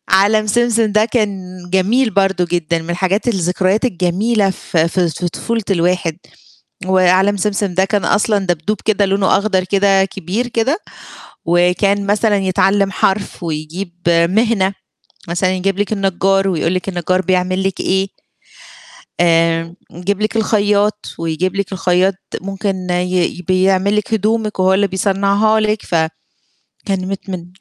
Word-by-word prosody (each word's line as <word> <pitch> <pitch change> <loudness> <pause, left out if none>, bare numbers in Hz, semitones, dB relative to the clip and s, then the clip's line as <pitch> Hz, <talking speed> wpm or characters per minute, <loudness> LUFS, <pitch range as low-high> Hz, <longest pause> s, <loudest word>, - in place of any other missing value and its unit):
عالم 215 +2 +3
سمسم 230 -1 +1
ده 215 +1 +4
كان 210 -4 -1 0.3
جميل 220 +7 +2
برضه 195 -2 +1
جدًا، 170 -1 0
من 165 - -6
الحاجات، 190 +6 0
الذكريات 190 +1 0
الجميلة 200 +1 +1
في 165 -3 -1
في 175 0 0
في 175 +3 -3
طفولة 225 +5 -3
الواحد. 175 -3 0 0.7
وعالم 190 +2 +3
سمسم 200 -1 -1
ده 190 +2 +3
كان 200 -2 -1
أصلًا 210 +2 +2
دبدوب 175 +4 -1
كده 205 -2 +2
لونه 195 0 +2
أخضر 195 -2 0
كده 195 0 +3
كبير 195 +5 -3
كده، 240 +7 0 0.7
وكان 180 +4 +2
مثلًا 205 +1 +2
يتعلّم 195 +1 +1
حرف 195 0 -1
ويجيب 165 +3 -5 0.2
مهنة، 190 +4 +2 0.6
مثلًا 175 +2 0
يجيب 195 +1 -1
لِك 205 +1 -1
النجّار 195 -1 +1
ويقول 175 -1 0
لِك 185 +1 -3
النجّار 185 0 0
بيعمل 185 +1 0
لِك 195 -1 -2
إيه؟ 190 +1 0 1.1
آآ، 165 0 +2 0.2
يجيب 190 +4 -3
لِك 215 +1 -1
الخيّاط، 210 -1 +1
ويجيب 165 +3 -2
لِك 200 0 -2
الخيّاط 185 +1 +1 0.3
ممكن 195 -1 -4
ي 180 0 0
بيعمل 190 +2 +2
لِك 225 +2 -2
هدومِك 215 -1 0
وهو 185 0 +3
اللي 200 +1 +2
بيصنعها 200 +3 +1
لِك 215 0 0
ف - - -2 0.9
كان 190 -2 -2
مت 195 0 -6
من 175 -2 -5
195 Hz, 140 wpm, -16 LUFS, 180-205 Hz, 1.1 s, ده